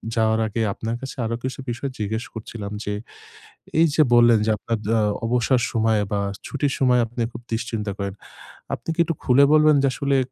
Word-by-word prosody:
যাওয়ার 110 0 +2
আগে 110 +2 -2
আপনার 115 +1 -4
কাছে 135 - -6
আরো 115 +1 -1
কিছু 130 +1 -4
বিষয় 120 +3 -3
জিজ্ঞেস 110 +2 -2
করছিলাম। 110 -2 -7
যে, 105 - -3 0.9
এইযে 155 -1 +4
বললেন 120 -1 +6
যে - - +2
আপনার 115 +2 -3
জা 115 0 +3 0.3
অবসর 125 +1 +2
সময়ে 110 -2 +2
বা 100 - +1 0.3
ছুটির 140 0 -1
সময় 125 -2 +4
আপনি 120 +1 -7
খুব 120 +1 -9
দুশ্চিন্তা 110 -3 -2
করেন। 100 -1 -3 0.6
আপনি - - -6
কি - - -13
একটু 165 - -2
খুলে 130 +3 +5
বলবেন 155 0 +6
যে - - +4
আসলে 140 -1 +1
115 Hz, 180 wpm, -23 LUFS, 110-130 Hz, 0.9 s, বললেন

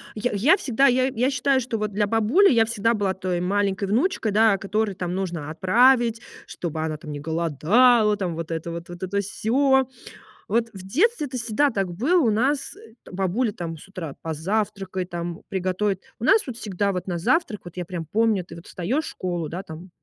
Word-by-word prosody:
я 235 +3 -1
я 255 - +4
всегда 275 - +2
я 255 0 +3
я 255 +1 0
считаю, 265 0 +2
что 235 -1 -3
вот 210 -1 -3
для 205 +1 +1
бабули 225 - +4
я 225 -2 +4
всегда 230 0 +1
была 200 -4 0
той 185 -2 -2
маленькой 195 +1 0
внучкой, 225 - 0
да, 220 0 +5
а - - 0
которой 205 0 -1
там 180 0 -3
нужно 175 -6 -3
отправить 230 +7 +3 0.3
чтобы 160 -2 -5
она 155 -1 -3
там 150 -1 -8
не 145 - -6
голодала 200 - +3
там 180 -4 -2
вот 165 0 -5
это 165 +1 -3
вот 170 +1 -7
вот 175 0 -9
это 200 +2 -1
всё. 265 +6 +2 0.6
Вот 230 +2 +1
в 190 -1 -10
детстве 345 - +1
это 255 - -8
всегда 240 +4 +1
так 195 -4 -2
было 295 - +2
у 225 -5 +3
нас, 270 +6 0
э, 425 - -15 0.2
бабуля 195 +5 0
там 170 -4 -6
с - - -13
утра 170 -7 -7
позавтракай 190 +3 -2
там, 170 -1 -5
приготовит. 190 +1 -1 0.2
У - - -8
нас 420 - +5
вот 250 - -5
всегда 200 -3 -2
вот 180 - -4
на 175 -2 -2
завтрак 230 - 0
вот 175 - -10
я 180 - -3
прям 170 -2 -6
помню 215 -1 +1
ты 165 - -11
вот 170 - -12
встаешь 240 - -2
в - - -6
школу, 175 -4 -4
да, 175 +3 -5
там, 170 0 -10
200 Hz, 205 wpm, -24 LUFS, 175-235 Hz, 0.6 s, да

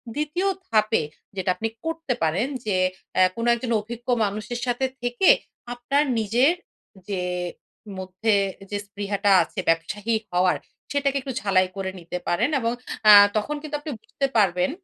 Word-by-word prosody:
২য় 305 +6 -1 0.2
ধাপে 215 -4 +2 0.3
যেটা 190 -1 -2
আপনি 225 - -2 0.2
করতে 325 -4 -2
পারেন 170 +10 +1 0.2
যে 205 -3 0 0.4
এ্যা 185 0 +6
কোনো 230 +1 -2
একজন 235 0 -4
অভিজ্ঞ 235 +3 -9 0.2
মানুষের 215 +4 -4
সাথে 245 +1 0 0.2
থেকে, 245 +9 +2 0.4
আপনার 255 +4 +1 0.2
নিজের 240 - +3 0.6
যে 190 -3 -1 0.7
মধ্যে 190 +4 0 0.4
যে 205 - -1
স্পৃহাটা 200 0 -1
আছে - - -8
ব্যবসায়ী 205 +7 0 0.2
হওয়ার, 180 +1 +2 0.3
সেটাকে 280 -1 +1
একটু 265 0 -5
ঝালাই 185 -2 +3
করে 190 -1 -3
নিতে 175 +1 -5
পারেন। 190 +10 +2
এবং 230 -1 0 0.4
আ - - +12 0.3
তখন 215 +8 -1
কিন্তু 305 -1 -5
আপনি 295 +1 -6
বুঝতে 250 +5 -3
পারবেন, 180 -3 +3
220 Hz, 145 wpm, -24 LUFS, 190-255 Hz, 0.7 s, আ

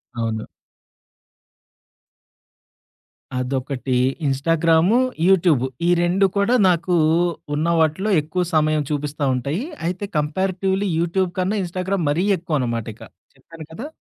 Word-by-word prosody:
అవును. 110 -1 -3 2.9
అదొకటి 130 0 -2 0.3
Instagram, 165 - +2 0.3
YouTube 165 -9 +3 0.2
ఈ - - +3
2 185 +3 +2
కూడా 200 +5 +3
నాకు 175 +1 0 0.6
ఉన్న 155 +2 -1
వాటిలో 160 +7 +1
ఎక్కువ 180 +4 -2
సమయం 155 -1 +2
చూపిస్తా 145 0 -3
ఉంటాయి. 140 - -2 0.2
అయితే 185 +3 -3
కంపారిటివ్‌లి 190 +5 -1
యూట్యూబ్ 175 +1 0
కన్నా 195 +4 0
ఇన్‌స్టాగ్రామ్ 185 0 -2
మరీ 175 +6 0
ఎక్కువనమాట 130 - -2
ఇక - - -14 0.3
చెప్పాను 165 -2 -12
కదా! 250 - -6
165 Hz, 105 wpm, -21 LUFS, 145-185 Hz, 2.9 s, YouTube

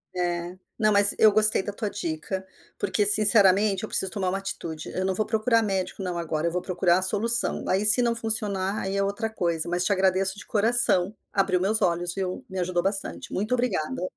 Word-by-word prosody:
É. 175 0 -3 0.2
Não, 215 -2 +1
mas 200 0 +6
eu 215 -1 +5
gostei 215 -1 +4
da 205 - -5
tua 210 0 -4
dica, 180 +3 -5 0.3
porque, 210 - -1
sinceramente, 205 -1 +4
eu - - -6
preciso 190 - +2
tomar 190 -4 -2
uma 195 - -2
atitude. 170 -5 -6
Eu 185 - -3
não 190 - -1
vou 215 - -1
procurar 225 +1 0
médico 195 -1 -4
não 180 -2 -4
agora, 160 -1 -3
eu - - -2
vou 180 +1 -3
procurar 175 -1 0
a - - -5
solução. 220 +5 +1
Aí, 190 +3 0
se 220 +4 +8
não 235 -1 0
funcionar, 210 -3 -2
aí 195 +1 -4
é 200 - 0
outra 200 +3 -3
coisa. 170 -6 -3
Mas, 175 +1 -1
te 205 - +1
agradeço 190 +1 0
de - - -9
coração. 215 -3 +1 0.2
Abriu 195 -2 0
meus 210 +4 -1
olhos, 175 0 -1
viu. 185 -2 -5
Me 190 0 -6
ajudou 175 -1 -2
bastante. 195 0 -2
Muito 210 +5 -2
obrigada. 205 -10 -2
195 Hz, 210 wpm, -24 LUFS, 180-215 Hz, 0.3 s, se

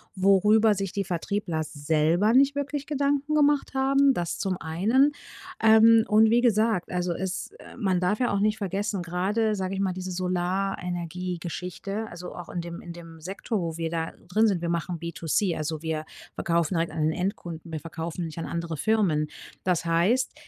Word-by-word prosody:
worüber 210 +3 +4
sich 195 -1 -3
die 200 - -1
Vertriebler 175 -2 -2
selber 160 +7 +1
nicht 275 +2 +5
wirklich 285 0 -3
Gedanken 285 0 0
gemacht 295 -2 +3
haben, 275 +1 +4
dass 175 -7 -2
zum 190 -2 -1
einen. 220 - +2 0.5
Ähm, 225 0 +7
und 220 +1 +5
wie 235 +2 +4
gesagt, 220 -5 +2
also 180 0 -1
es, 190 +2 -4
äh - - -13
man 190 -6 +1
darf 185 +4 0
ja 245 - +1
auch 200 - +1
nicht 210 +1 +1
vergessen. 200 0 -2
Gerade 195 +6 0
sage 190 -1 -3
ich 195 - -3
mal 195 -2 0
diese 185 0 -5
Solarenergiegeschichte. 180 +1 -3
Also 175 +1 -8
auch 175 - -8
in 175 - -3
dem, 170 0 -7
in 175 - -8
dem 165 -1 -12
Sekto, 195 +6 -3
wo 165 -2 -3
wir 165 -1 -2
da 165 0 -2 0.2
drin 215 +5 +3
sind. 190 -5 0
Wir 170 - -2
machen 170 0 -2
B2C. 170 +2 -1
Also, 155 0 -3
wir 160 -1 -3 0.3
verkaufen 170 +1 0
halt 165 0 0
an 160 - -3
den 155 +1 +2
Endkunden. 175 -2 -4
Wir 160 - -3
verkaufen 165 +2 -5
nicht 160 0 -8
an 165 - -3
andere 170 -1 -3
Firmen. 175 -6 +1 0.4
Das 175 -2 0
heißt, 185 +11 +2
185 Hz, 180 wpm, -26 LUFS, 170-215 Hz, 0.5 s, Ähm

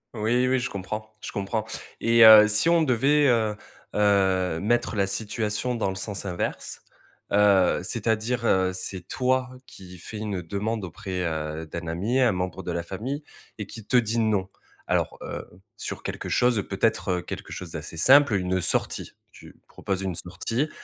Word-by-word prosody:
Oui, 120 +4 +1
oui, 130 +1 +2
je 120 - -3
comprends, 110 +3 -6
je - - -6
comprends 105 +2 -2 0.4
et 115 0 +5
heu, 110 -1 +10
si 105 +9 +3
on 170 -1 +4
devait, 140 +2 +3
heu 110 -3 +2 0.4
heu, 95 -4 +2
mettre 115 +2 0
la 100 -1 +2
situation 105 +4 -2
dans 110 -4 -1
le - - -6
sens 100 +1 -5
inverse, 90 -2 -4 0.5
heu, 100 -3 +4
c'est-à-dire, 115 +2 -1
heu, 95 -4 +2
c'est 95 0 -5
toi 130 0 0 0.2
qui 90 -1 -13
fais 110 - -8
une 105 -4 -3
demande 105 +5 -3
auprès, 95 +1 -5
heu, 80 0 -4
d'un 85 +2 -6
ami, 100 +11 -1
un 120 -3 +4
membre 90 0 -3
de 90 - -4
la 85 0 -2
famille 125 - -5 0.4
et 105 - -5
qu'il 110 -1 -10
te 125 - +3
dit: 115 -1 +1
«non». 105 -4 +1 0.4
Alors - - -1
heu, - - -6 0.3
sur - - -6
quelque - - -5
chose, 120 -5 +2
peut-être, 90 -1 0
quelque - - -7
chose 90 -3 -7
d'assez 80 +2 -7
simple, 135 - +6
heu, 100 - +2
une 90 0 -1
sortie. 80 - -1 0.2
Tu - - -15
proposes 95 -1 -4
une 95 -3 -3
sortie, 115 - -3
105 Hz, 175 wpm, -25 LUFS, 95-115 Hz, 0.5 s, heu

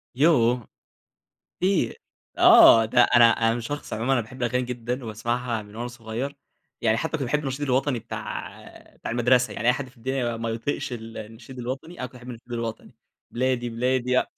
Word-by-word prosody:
يوه! 125 -5 +3 0.9
كتير، 185 0 0 0.4
آه 115 -1 +8
ده 120 +3 +4
أنا 120 0 +6
أنا 115 +1 +1
شخص 145 +6 -6
عمومًا 120 +5 0
أنا 130 - +3
باحب 130 +3 -9
الأغاني 125 +1 +1
جدًا 125 +1 -4
وباسمعها 115 +1 -2
من 105 +1 -14
وأنا 120 +1 -4
صغيّر، 120 +4 -5 0.4
يعني 110 -1 +2
حتّى 160 - -3
كنت 160 - -2
باحب 150 - +1
النشيد 135 0 -4
الوطني 130 -1 +1
بتاع 115 +1 -8
بتاع - - -6
المدرسة، 125 +1 +3
يعني 115 - -1
أي - - +7
حد 130 +1 -5
في 130 - -22
الدنيا 120 -1 -2
ما 115 0 -3
يطيقش 115 +3 -3
ال 115 -1 -7
النشيد 115 +4 -10
الوطني 135 +8 -6
انا 125 - -3
كنت - - -17
باحب 125 0 -12
النشيد 120 0 -11
الوطني، 115 -1 -5 0.4
بلادي، 125 -1 0
بلادي 125 +2 0
لأ، 130 - +2
120 Hz, 180 wpm, -25 LUFS, 115-130 Hz, 0.9 s, آه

